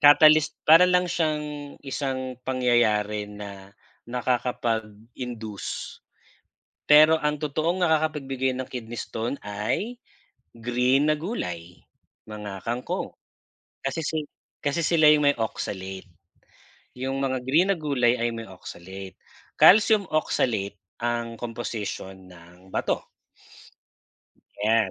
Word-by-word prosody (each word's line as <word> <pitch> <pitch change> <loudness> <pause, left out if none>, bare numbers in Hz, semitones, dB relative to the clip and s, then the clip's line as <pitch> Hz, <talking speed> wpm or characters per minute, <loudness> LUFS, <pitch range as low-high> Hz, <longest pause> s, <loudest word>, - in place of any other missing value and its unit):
catalyst 155 +1 +7
para 165 +4 +8
lang 180 -1 +2
siyang 150 -3 -2
isang 130 -2 -3
pangyayari 110 -5 +2
na 100 -1 -10 0.3
nakakapag-induce. 115 -2 -3 0.9
Pero 155 +2 +7
ang 150 -1 -1
totoong 155 +5 -1
nakakapagbigay 150 -5 +1
ng 130 - -4
kidney 120 -2 -6
stone 115 +5 -4
ay 105 - -2 0.6
green 125 +4 +1
na 155 - +3
gulay, 90 - -5 0.5
mga 105 -3 -7
kangkong 125 +10 -2 0.8
kasi 165 - -1 0.6
kasi 145 +4 -1
sila 160 -1 +4
yung 150 -1 +6
may 145 - +2
oxalate 95 -3 -4 0.8
yung 130 +2 -3
mga 130 -1 0
green 165 +8 +4
na 195 - 0
gulay 125 -5 +2
ay 120 0 -1
may 115 - -5
oxalate, 95 0 -10 0.4
Calcium 210 +1 +6
oxalate 110 -9 0 0.2
ang 120 -1 -2
komposisyon 105 -5 -5
ng 90 +1 -16
bato. - - -2 1.6
Ayan. 110 -2 +3
125 Hz, 100 wpm, -25 LUFS, 105-150 Hz, 1.6 s, para